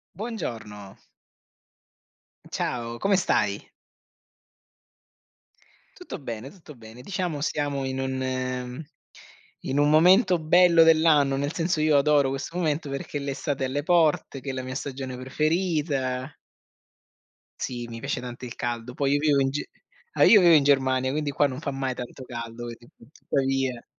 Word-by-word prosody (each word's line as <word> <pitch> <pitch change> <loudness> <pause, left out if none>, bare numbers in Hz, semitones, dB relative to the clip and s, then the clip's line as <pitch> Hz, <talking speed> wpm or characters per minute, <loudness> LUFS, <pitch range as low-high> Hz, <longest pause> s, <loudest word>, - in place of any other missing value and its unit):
Buongiorno. 115 - -6 1.5
Ciao, 120 -1 -3
come 195 +8 +2
stai? - - 0 2.3
Tutto 360 - -8
bene, 120 -2 -6
tutto 155 -2 -14
bene, 115 +1 -13
diciamo 175 -1 -3
siamo 145 -3 -1
in 130 0 -3
un 130 0 -3 0.8
in 135 - -2
un 145 +1 +4
momento 180 +4 +5
bello 170 +1 +5
dell'anno, 155 -4 +4
nel 145 +3 -2
senso 165 -1 0
io 155 -1 +3
adoro 140 -1 +3
questo 135 +5 -5
momento 155 -3 -1
perché 140 +1 -4
l'estate 140 0 -3
è - - -1
alle 145 +3 -2
porte, 160 -4 +2
che 135 - -6
è - - -2
la 130 0 -4
mia 130 0 -6
stagione 130 -1 -5
preferita 145 -2 -1 1.3
Sì, 120 -1 -4
mi 115 0 -7
piace - - -3
tanto 125 0 -8
il 120 - -8
caldo. 120 0 -4
Poi 140 +1 0
io - - +1
vivo 145 -2 +3
in 135 - +2
G 140 +2 -3 0.5
ah, - - +3
io 215 - +8
vivo 175 -3 +6
in 150 -3 +6
Germania, 130 -2 +2
quindi 150 +1 -2
qua 145 +1 +2
non 130 -1 -6
fa 145 -2 -3
mai 135 -1 -2
tanto 125 +1 -8
caldo 120 -1 -7
vedi, 120 0 -10 0.3
tuttavia. 135 -3 -1
135 Hz, 150 wpm, -25 LUFS, 130-155 Hz, 2.3 s, io